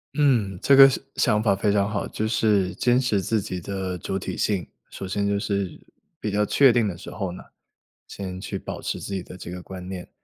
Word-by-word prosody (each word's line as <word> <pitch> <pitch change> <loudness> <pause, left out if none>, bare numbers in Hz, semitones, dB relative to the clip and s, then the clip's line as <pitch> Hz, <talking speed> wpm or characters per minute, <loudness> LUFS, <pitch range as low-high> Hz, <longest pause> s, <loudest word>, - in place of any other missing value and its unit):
嗯， 115 - +2
这 140 - +5
个 135 0 +10
想 130 - -3
想 105 -3 +2
法 105 -3 +3
非 100 +1 +1
常 100 0 +2
好， 105 -1 -2
就 110 - -3
是 105 -4 +2
坚 125 0 +3
持 115 -6 +1
自 110 +3 0
己 95 -2 -5
的 95 0 -4
主 95 +3 -3
体 - - -5
性。 100 -4 0 0.2
首 95 - -7
先 100 +2 -1
就 100 0 +1
是 100 -3 -2 0.4
比 105 - -3
较 105 +1 +2
确 135 +3 +5
定 120 -2 +3
的 95 -4 -3
时 95 - -9
候 95 -4 -4
呢， 90 - -9 0.7
先 95 -2 -6
去 - - -4
保 - - -6
持 - - -3
自 100 - -6
己 95 -2 -3
的 90 - -11
这 90 - -8
个 90 +1 -6
观 90 -1 -8
念。 95 -1 -7
100 Hz, 245 characters per minute, -24 LUFS, 95-110 Hz, 0.7 s, 个